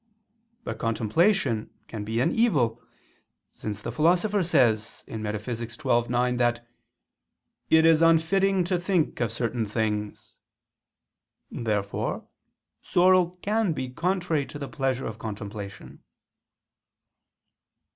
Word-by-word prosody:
But - - -5
contemplation 115 - +1 0.2
can 110 -2 -6
be 110 +3 -1
an 165 - +2
evil: 145 - +1 0.7
since 105 -1 -6
the 115 - -3
Philosopher 180 - +2
says 120 - +1
(Metaph. 105 -1 -4 0.6
xii, 120 - -13
9) 125 0 +1
that 120 -1 0 1.0
"it 160 0 +5
is 165 -1 +5
unfitting 180 +4 +3
to 180 0 0
think 175 -3 0
of 115 -3 0
certain 115 0 -2
things." 105 -1 -3 1.2
Therefore 105 -3 -2 0.5
sorrow 180 0 +3
can 210 -3 +1
be 130 -3 -4
contrary 170 0 -1
to - - -8
the 140 -1 -5
pleasure 135 -3 -2
of 110 0 -6
contemplation. 100 -2 -7
125 Hz, 105 wpm, -26 LUFS, 110-175 Hz, 1.2 s, it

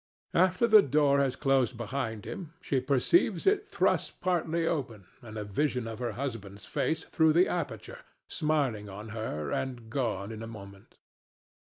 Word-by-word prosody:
After 185 +5 +3
the 215 -2 +8
door 140 -2 +3
has 135 -2 +1
closed 135 -4 +1
behind 115 -2 -3
him, 170 -5 -7
she 140 -6 0
perceives 135 - +2
it 405 +1 +3
thrust - - 0
partly 170 -2 0
open 125 - -2 0.2
and 110 -3 -9
a 105 - -3
vision 125 +3 -1
of 115 0 -6
her 120 -1 -2
husband's 105 -7 -5
face 160 0 -1
through 160 -1 +3
the 175 +3 +5
aperture, 145 - -4 0.3
smiling 135 -10 0
on 105 +3 -8
her 110 -10 -4
and 120 -4 -3
gone 110 -6 -2
in 110 0 -7
a 115 - -6
moment. 100 -3 -12
130 Hz, 160 wpm, -29 LUFS, 110-155 Hz, 0.3 s, the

